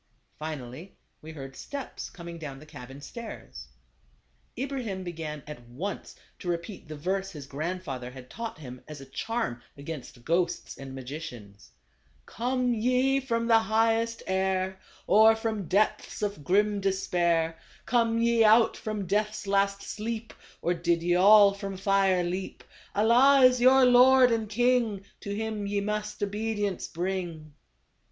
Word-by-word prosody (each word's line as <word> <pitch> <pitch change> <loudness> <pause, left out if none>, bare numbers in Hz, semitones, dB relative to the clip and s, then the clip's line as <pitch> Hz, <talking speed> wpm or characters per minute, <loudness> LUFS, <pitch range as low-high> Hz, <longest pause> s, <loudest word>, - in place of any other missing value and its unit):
Finally 155 +2 -7 0.3
we 160 - -9
heard 135 -3 -9
steps 285 -1 -7
coming 170 -1 -9
down 140 -4 -7
the 150 - -13
cabin 135 -3 -11
stairs. 180 - -9 0.9
Ibrahim 250 -8 -3
began 160 -4 -6
at 150 -4 -9
once 180 +12 -6 0.2
to 180 - -8
repeat 170 +1 -4
the 155 - -7
verse 190 +5 -2
his 150 -7 -9
grandfather 140 -3 -4
had 125 0 -11
taught 230 - -6
him 125 -5 -10
as 150 -2 -8
a 135 - -10
charm 180 - -3 0.2
against 140 -4 -8
ghosts 170 +1 0
and 135 -1 -9
magicians: 125 - -9 0.3
" - - -41 0.2
Come 250 +1 -1
ye 255 +4 +2
from 230 -3 -1
the 230 -1 +5
highest 225 +1 +1
air, 190 0 0 0.3
Or 220 +2 +6
from 220 -4 -3
depths 210 +2 0
of 200 -8 -3
grim 205 +4 +2
despair; 170 -4 0 0.3
Come 230 -2 +2
ye 235 0 +3
out 220 +1 +5
from 215 -2 -4
death's 210 +3 -1
last 200 0 +1
sleep, 225 +1 -5 0.3
Or 175 - +2
did 170 0 0
ve 175 +1 +2
all 200 +2 +7
from 195 -1 -6
fire 195 -2 +2
leap 180 +2 -4 0.2
— - - -25
Allah 245 +6 +5
is 250 -1 +6
your 260 +1 +7
Lord 250 0 +7
and 225 -2 -1
King, 230 -3 +1
To 200 0 -5
him 215 -1 -3
ye 200 0 0
must 210 0 -3
obedience 205 -1 -2
bring." 170 -4 -4
195 Hz, 145 wpm, -28 LUFS, 160-225 Hz, 0.9 s, all